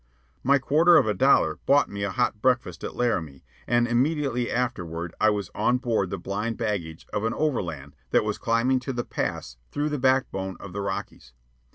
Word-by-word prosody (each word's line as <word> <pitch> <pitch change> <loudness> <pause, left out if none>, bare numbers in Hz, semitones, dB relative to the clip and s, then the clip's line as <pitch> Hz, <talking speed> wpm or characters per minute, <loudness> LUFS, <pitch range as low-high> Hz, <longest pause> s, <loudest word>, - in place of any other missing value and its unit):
My 140 +2 +4
quarter 155 +6 +5
of - - +4
a 105 - +1
dollar 135 +8 +3
bought 145 +1 +5
me 100 0 -6
a 100 - 0
hot 105 +2 -1
breakfast 125 -2 0
at - - -5
Laramie, 85 - -1 0.2
and 120 0 +3
immediately 130 0 0
afterward 85 -9 -3
I 110 - +6
was 105 -3 -2
on 125 - +2
board 115 -7 0
the 95 - -3
blind 105 +5 -3
baggage 95 -8 -3
of 105 - -1
an 115 - -1
overland 85 - -2
that - - +3
was 105 -1 -2
climbing 120 +3 +2
to 130 +1 -5
the 120 -1 -3
pass - - -4
through 150 +1 -1
the 150 -1 -2
backbone 125 -8 0
of 95 -3 -9
the 100 - -3
Rockies. 95 -9 -5
115 Hz, 190 wpm, -25 LUFS, 95-130 Hz, 0.2 s, I